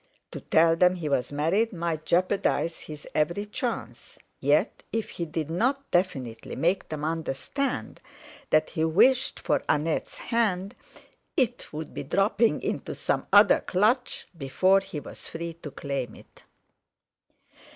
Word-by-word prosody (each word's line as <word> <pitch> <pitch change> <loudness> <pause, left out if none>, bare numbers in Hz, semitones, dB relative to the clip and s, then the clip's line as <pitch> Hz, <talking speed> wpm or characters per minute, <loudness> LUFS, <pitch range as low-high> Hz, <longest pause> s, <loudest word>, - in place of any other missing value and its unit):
To - - -7
tell 165 +1 +4
them 180 +2 +4
he 170 -4 -4
was 130 -3 0
married 170 +11 +1
might 165 -4 -3
jeopardise 175 -2 +1
his 150 -1 -10
every 170 +7 0
chance; 235 +3 -5 0.2
yet, - - +2
if 225 -1 -2
he 170 - -4
did 160 -1 -4
not 265 +10 0
definitely 135 -11 -1
make 175 +4 0
them 150 -1 -4
understand 165 - -3 0.5
that 155 0 +3
he 160 - -1
wished 235 +11 +3
for - - +1
Annette's 155 +1 0
hand, 205 -4 0 0.6
it 245 -2 0
would 155 +1 -6
be - - -4
dropping 215 +3 +2
into - - -3
some - - -1
other 205 0 +7
clutch 220 +7 0
before 185 +6 +3
he 195 -5 -6
was - - -10
free 170 0 -5
to 150 - -6
claim 140 -5 -4
it. - - -18
170 Hz, 140 wpm, -27 LUFS, 155-205 Hz, 0.6 s, other